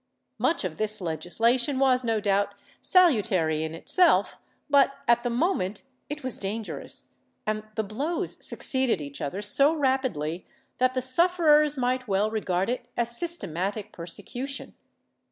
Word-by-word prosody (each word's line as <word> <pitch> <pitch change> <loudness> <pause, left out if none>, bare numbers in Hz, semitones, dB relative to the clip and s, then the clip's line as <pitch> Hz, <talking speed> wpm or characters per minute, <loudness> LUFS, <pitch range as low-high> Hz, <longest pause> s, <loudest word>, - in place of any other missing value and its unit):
Much 330 - +1
of 175 -4 -4
this 215 0 -1
legislation 225 - 0
was 260 -1 +3
no 225 -2 0
doubt 200 0 0 0.3
salutary 210 - +3
in 160 0 -4
itself 310 - +2 0.3
but, 280 -2 +4
at 235 0 +4
the 245 - -2
moment, 235 - -1 0.3
it 295 0 -6
was 255 -2 -3
dangerous, 210 +2 -6 0.4
and 215 0 -1
the 220 - 0
blows 275 - -3
succeeded 260 - +1
each 140 -1 -8
other 185 +9 -4
so 275 +9 +4
rapidly 260 - -1 0.4
that 255 +1 +2
the 255 - -1
sufferers 300 0 +3
might 255 0 -1
well 205 +2 +1
regard 190 -4 -1
it 250 +2 -3
as 235 0 +2
systematic 210 - -2
persecution. 245 +11 -6
235 Hz, 135 wpm, -26 LUFS, 195-275 Hz, 0.4 s, but